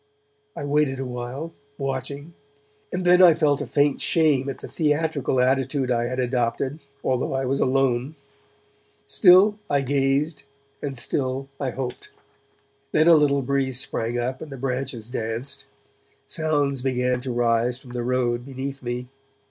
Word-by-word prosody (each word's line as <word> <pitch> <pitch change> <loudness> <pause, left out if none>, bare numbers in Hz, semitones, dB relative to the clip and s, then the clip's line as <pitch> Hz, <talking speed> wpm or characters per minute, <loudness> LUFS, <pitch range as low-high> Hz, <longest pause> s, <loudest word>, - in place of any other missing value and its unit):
I 145 - -4
waited 145 -2 +1
awhile, 130 +5 -5 0.2
watching; 140 +3 -4 0.6
and 180 0 -3
then 180 +1 +6
I 175 -3 +8
felt 150 -4 +2
a - - -4
faint 145 -1 +1
shame 145 -5 +2
at 135 - -5
the - - -9
theatrical 150 -4 0
attitude 130 +1 +1
I 120 0 +1
had 130 +1 -4
adopted, 125 +3 -1 0.2
although 130 +1 0
I 135 0 -1
was 135 +2 0
alone. 130 +1 +1 0.9
Still 200 +4 +6
I 140 -1 +2
gazed 140 +3 0 0.4
and 140 -2 -4
still 135 +2 -1
I 135 - -1
hoped. 125 -1 -6 0.8
Then 155 +2 +3
a 170 - +8
little 140 -3 +3
breeze 130 -1 +1
sprang 120 -3 -1
up 125 +2 -3
and 155 - -8
the 135 - -7
branches 125 -3 -3
danced. 125 +3 -4 0.6
Sounds 145 -4 0
began 125 -1 0
to 130 0 -4
rise 120 0 +1
from 130 -1 -13
the 125 -1 -3
road 120 -1 0
beneath 135 +1 -6
me. 125 0 -4
135 Hz, 150 wpm, -24 LUFS, 125-145 Hz, 0.9 s, I